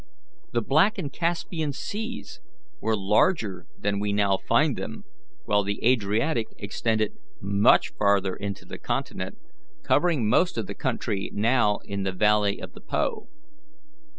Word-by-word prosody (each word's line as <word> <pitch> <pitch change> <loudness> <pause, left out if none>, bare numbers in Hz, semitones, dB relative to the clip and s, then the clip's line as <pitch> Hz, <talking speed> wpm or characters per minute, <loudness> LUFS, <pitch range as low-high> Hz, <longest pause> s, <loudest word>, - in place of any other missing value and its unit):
The 120 -1 0
Black 160 - +3
and 140 -2 -4
Caspian 165 -3 -1
Seas 220 - -6 0.4
were 110 -1 0
larger 105 - +1
than 100 0 -1
we 105 0 -1
now 100 -1 +3
find - - +2
them; - - -6 0.4
while 105 0 +3
the 100 +1 -3
Adriatic 115 +2 +2
extended 110 +1 -1 0.3
much 100 +1 +4
farther 100 -2 +2
into 100 -1 -5
the - - -8
continent, - - -3 0.5
covering 150 -8 +2
most 150 +7 +3
of 115 - -1
the - - -6
country 95 -1 -2
now 110 -1 +3
in 100 -1 -4
the 95 0 -1
valley 105 +1 +2
of - - -8
the - - -13
Po. - - -2
105 Hz, 140 wpm, -26 LUFS, 100-135 Hz, 0.5 s, much